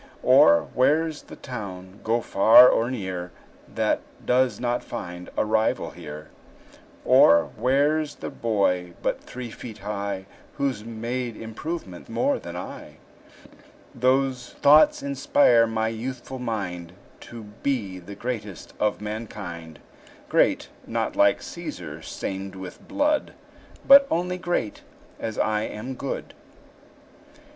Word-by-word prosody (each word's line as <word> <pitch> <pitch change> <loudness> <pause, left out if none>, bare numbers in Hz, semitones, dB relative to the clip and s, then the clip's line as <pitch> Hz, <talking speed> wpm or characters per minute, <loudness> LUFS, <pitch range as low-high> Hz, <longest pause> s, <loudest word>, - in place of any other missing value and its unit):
Or, 85 0 +6
where's 155 +4 +2
the - - -12
town, 100 -6 -8
go 115 +2 +1
far 110 +5 +7
or 115 +1 +1
near, 95 -7 -4 0.4
That - - 0 0.2
does 125 0 +2
not 120 0 -1
find 90 0 -7
a - - +2
rival 110 +1 0
here? 75 +1 -9 0.8
Or, 85 0 +6
where 145 +4 +2
's 150 - -9
the - - -7
boy 90 -6 0
but - - -1
three 125 -2 -8
feet 110 -2 -9
high 100 -1 -4 0.3
Who's 135 -6 -1
made 115 +1 -4
improvement 115 - -6
more - - +1
than - - -8
I? - - -8 1.0
Those 130 0 +1
thoughts 150 +2 +5
inspire 135 -4 +4
my 110 0 -1
youthful 125 +3 -6
mind 90 -8 -4 0.4
To 115 -1 -9 0.2
be 105 -10 -2
the 90 +3 -10
greatest 110 -6 -6
of 105 -1 0
mankind; 100 -7 -7 0.5
Great, - - +2 0.2
not - - -2
like - - +4
Cæsar, - - -7
stained 95 0 -5
with 95 -1 -10
blood; 295 +1 0 0.5
But 275 0 +9
only 180 +2 -1
great, 175 - -2 0.4
as 110 -2 -4
I 105 -1 +1
am 110 +4 -5
good. 135 +1 -5
115 Hz, 120 wpm, -25 LUFS, 100-130 Hz, 1.0 s, But